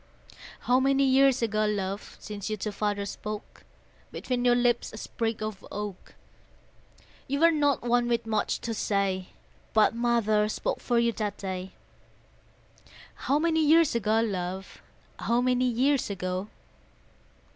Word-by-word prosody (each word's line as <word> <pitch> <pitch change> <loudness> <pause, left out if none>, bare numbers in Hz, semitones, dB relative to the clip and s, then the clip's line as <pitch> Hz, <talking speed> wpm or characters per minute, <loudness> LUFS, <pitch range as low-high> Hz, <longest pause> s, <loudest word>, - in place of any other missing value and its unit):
How 250 +1 +3
many 275 +1 +3
years 265 -1 +4
ago, 215 -1 +1
love, 200 -1 -3
Since 205 -1 -6
you 215 - -2
to 210 +1 -3
Father 205 0 -2
spoke? 210 +1 -7 0.5
Between 250 -1 -2
your 245 -1 +4
lips 245 -1 +1
a 220 - -9
sprig 225 0 -3
of 215 -2 -5
oak: 205 -2 -6 1.1
You 280 +1 -1
were 335 0 +7
not 290 -5 +1
one 240 0 +2
with 235 -1 0
much 215 -2 -1
to 230 - -3
say, 195 -3 -1 0.5
But 215 +1 +5
Mother 230 -3 +2
spoke - - -2
for 240 - 0
you 235 0 +3
that 210 -3 -3
day, 190 -1 -5 1.4
How 280 - 0
many 320 0 +2
years 320 +1 +5
ago, 225 -1 +2
love, 190 -3 -4 0.4
How 235 +1 +1
many 250 0 +2
years 255 +2 +1
ago? 185 0 -3
225 Hz, 140 wpm, -27 LUFS, 205-250 Hz, 1.4 s, were